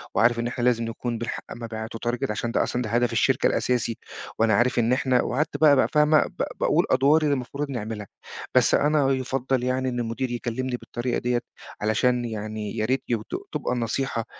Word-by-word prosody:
وعارف 115 +2 +4
إن 120 - -1
إحنا 120 0 -3
لازِم 120 -1 +2
نكون 115 +1 -3
بنحقّق 120 +1 -4
مبيعات 115 -1 -6
و 115 - -5
target، 125 0 -1
عشان 115 +2 -2
ده - - +2
أصلًا 120 -2 -1
هدف 120 -1 +1
الشركة - - +3
الأساسي، 120 -2 0 0.4
وأنا 110 -1 +4
عارِف 120 +4 +3
إن 120 +2 +3
إحنا" 130 -2 +2
وقعدت 150 +6 -1
بقى 150 -2 +6
بقى 130 - +3
فاهمة؟ 150 0 +5
ب - - -4 0.2
باقول - - +3
أدوار 140 +4 +4
اللي 150 -2 +2
المفروض 140 +2 -3
نعملها. 110 -4 -5 0.5
بس - - +4
أنا 145 -2 +3
يُفضَّل 130 -1 -1
يعني 130 +1 0
إن 120 -1 -3
المدير 120 +2 -2
يكلِّمني 125 +1 -3
بالطريقة 120 +1 -3
ديَّة، 120 0 0 0.4
علشان 120 +3 +1
يعني 110 -1 -5
يا 110 - +1
ريت 130 +3 0
يب 115 -3 0
تب - - -4
تبقى - - -2
النصيحة 120 0 -2
120 Hz, 190 wpm, -25 LUFS, 115-130 Hz, 0.5 s, بقى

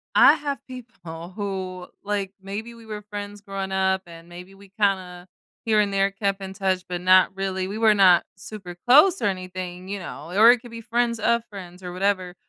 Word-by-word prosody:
I - - +8
have 285 -2 -3
people 190 -10 -10
who, 190 -3 -5 0.2
like, 200 -2 -2
maybe 210 +4 -6
we 230 -1 -15
were 210 -1 -6
friends 205 0 -7
growing 195 -1 -5
up, 190 0 +1
and 165 0 -13
maybe 180 +2 -12
we 200 0 -17
kinda, 185 -3 -1 0.4
here 215 -2 +3
and 200 -1 +1
there, 195 0 +2
kept 195 0 -2
in 190 0 -6
touch, 190 -2 -1
but 180 -1 -4
not 185 +1 +5
really. 190 -1 -2
We 205 - -5
were 220 -1 +5
not 185 -4 +6
super 185 -1 -9
close 300 +6 +6
or - - 0
anything, 185 -1 -4
you 200 0 -3
know, 170 -1 -8
or 225 +3 +8
it 245 - +2
could 240 - -12
be 230 - -7
friends 235 0 0
of 235 +1 +2
friends 185 -2 -10
or 180 - -6
whatever, 185 -1 -1
195 Hz, 200 wpm, -24 LUFS, 185-215 Hz, 0.4 s, I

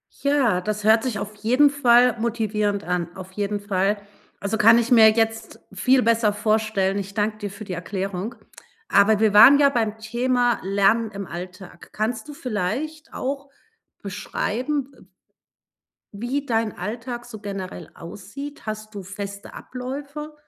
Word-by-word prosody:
Ja, 270 -10 +1
das 210 +2 -3
hört 220 +1 +5
sich 245 -6 -2
auf 210 +1 -6
jeden 250 +8 +4
Fall 250 -3 +4
motivierend 210 -3 -1
an. 175 -1 -3
Auf 190 0 -9
jeden 205 +1 -2
Fall, 200 0 0 0.4
also, 200 +2 -2
kann 225 +2 +7
ich 235 +1 0
mir 225 -3 +8
jetzt 225 0 -1
viel 250 +7 +3
besser 230 -2 +3
vorstellen. 210 -2 0
Ich 195 0 -6
danke 215 0 0
dir 205 - -4
für 200 +2 -9
die 190 - -5
Erklärung. 190 +4 -4 0.5
Aber 205 +1 +4
wir 215 -2 +3
waren 270 +7 +9
ja 285 -1 +6
beim 225 -5 -1
Thema 240 +2 0
Lernen 200 +3 +2
im 200 -1 -6
Alltag. 180 +1 -9
Kannst 220 +2 -3
du - - -7
vielleicht 275 - -4
auch 275 +1 -4 0.5
beschreiben, 255 +8 -3
äh - - -20 1.1
wie 245 +7 -3
dein 225 -4 -1
Alltag 240 +5 -5
so 225 -3 -10
generell 190 -4 -7
aussieht? 205 - -9
Hast 215 0 -6
du 200 - -6
feste 200 +1 -8
Abläufe? 280 +4 -7
220 Hz, 150 wpm, -23 LUFS, 200-245 Hz, 1.1 s, waren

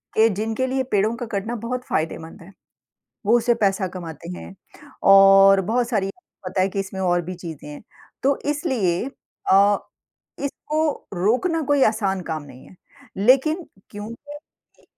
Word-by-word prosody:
कि 220 +1 +6
जिनके 220 +5 -2
लिए 265 0 0
पेड़ों 210 +3 +2
का 245 - -4
कटना 220 +2 -3
बहुत 250 +1 -3
फ़ायदेमंद 160 +1 -3
है। 185 +4 -13 0.8
वो 230 - +5
उससे 240 +1 +2
पैसा 195 0 +1
कमाते 170 -1 -8
हैं, 195 - -10 0.5
और 195 0 +7
बहुत 240 0 +1
सारी, 195 -5 0 0.4
पता 185 +1 -1
है 190 - +2
कि 195 +1 -3
इसमें 195 0 -6
और 175 -1 +1
भी 180 +2 -6
चीज़ें 160 -4 -9
हैं। 150 - -9 0.4
तो 275 +1 +2
इसलिए 235 -11 0 0.5
अ, 200 +1 +6 0.6
इसको 305 +2 -2
रोकना 255 - +1
कोई 280 -2 +3
आसान 200 -4 0
काम 155 -2 -3
नहीं 130 -3 -14
है। 185 - -17 0.4
लेकिन 270 - +3 0.3
क्योंकि 230 +8 -9 0.5
इ - - -26
205 Hz, 150 wpm, -22 LUFS, 185-250 Hz, 0.8 s, और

